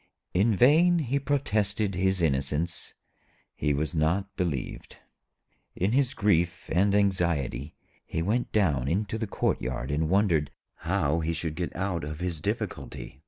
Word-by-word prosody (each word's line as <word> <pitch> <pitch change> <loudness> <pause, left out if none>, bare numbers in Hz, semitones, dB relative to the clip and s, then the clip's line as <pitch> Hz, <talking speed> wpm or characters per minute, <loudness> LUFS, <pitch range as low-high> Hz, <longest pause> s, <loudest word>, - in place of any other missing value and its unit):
In 105 +4 +3
vain 160 - +5
he 140 -3 0
protested 110 -7 0
his 95 -1 +1
innocence; 75 +3 -1 0.6
he 75 - -1
was 75 +4 -1
not 85 +5 0
believed. 85 -9 -3 0.8
In 95 +4 0
his 130 0 +2
grief 85 -4 +1
and 100 +4 +3
anxiety 85 -10 0 0.3
he 80 - -3
went 115 +7 0
down 75 - +2
into 100 +6 -1
the 110 - -2
courtyard 65 -7 -1
and 75 +2 0
wondered 90 -7 +2 0.3
how 75 +4 0
he 80 +1 -1
should 80 -1 -3
get 85 +2 -4
out 90 -3 -2
of 75 +1 -5
his 90 -4 -3
difficulty. 65 - -4
90 Hz, 140 wpm, -27 LUFS, 80-105 Hz, 0.8 s, vain